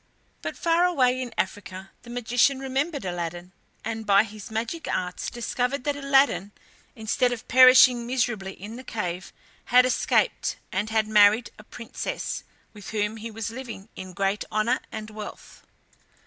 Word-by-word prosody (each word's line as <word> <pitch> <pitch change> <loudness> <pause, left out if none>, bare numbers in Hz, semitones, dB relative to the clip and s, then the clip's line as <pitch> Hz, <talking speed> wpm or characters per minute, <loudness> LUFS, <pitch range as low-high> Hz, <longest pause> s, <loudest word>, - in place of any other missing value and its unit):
But - - -5
far 335 +1 +3
away 255 -7 +2
in 250 -2 -5
Africa 190 -1 -4
the 240 - -14
magician 245 +3 +2
remembered 270 - -2
Aladdin, 175 0 -4 0.3
and 225 0 -3
by 200 -1 +5
his 215 -1 -10
magic 230 +9 -4
arts 180 -1 -3
discovered 250 +2 -2
that 290 +1 -1
Aladdin, 275 -8 +2 0.4
instead 225 +3 0
of 240 -2 -6
perishing 255 -1 +7
miserably 225 -6 -1
in 210 +5 -9
the 255 - -9
cave, 185 -6 -4 0.3
had 250 +1 +5
escaped, 255 - +1
and 205 +3 -1
had 220 -1 +1
married 215 +2 +5
a - - -12
princess, 230 +1 -5 0.3
with 205 -3 -10
whom 210 0 -1
he 225 +1 -6
was 225 0 -5
living 230 -4 -8
in 185 -1 -8
great 195 +2 -1
honour 230 +4 +1
and 215 0 -7
wealth. 215 -1 -10
225 Hz, 150 wpm, -25 LUFS, 205-255 Hz, 0.4 s, perishing